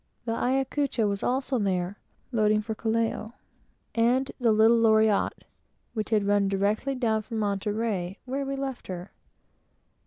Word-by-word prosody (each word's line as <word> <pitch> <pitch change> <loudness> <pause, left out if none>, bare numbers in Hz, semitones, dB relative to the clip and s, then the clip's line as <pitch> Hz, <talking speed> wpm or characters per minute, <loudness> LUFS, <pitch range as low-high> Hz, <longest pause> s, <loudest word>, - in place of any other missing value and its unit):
The 230 - -1
Ayacucho 265 -1 0
was 200 -1 -2
also 260 0 0
there, 190 -1 -1 0.3
loading 215 -2 +2
for 220 +1 -3
Callao, 225 0 -1 0.6
and 245 +4 +2
the 235 -3 +3
little 220 +2 +5
Loriotte, 220 -2 +3 0.5
which 215 -2 -3
had 215 -3 +2
run 205 -1 +3
directly 205 +7 0
down 225 -4 +1
from 220 +1 -6
Monterey, 205 -2 -1
where 270 +2 -2
we 275 0 -3
left 270 -2 -5
her. 180 0 -6
220 Hz, 135 wpm, -27 LUFS, 205-245 Hz, 0.6 s, little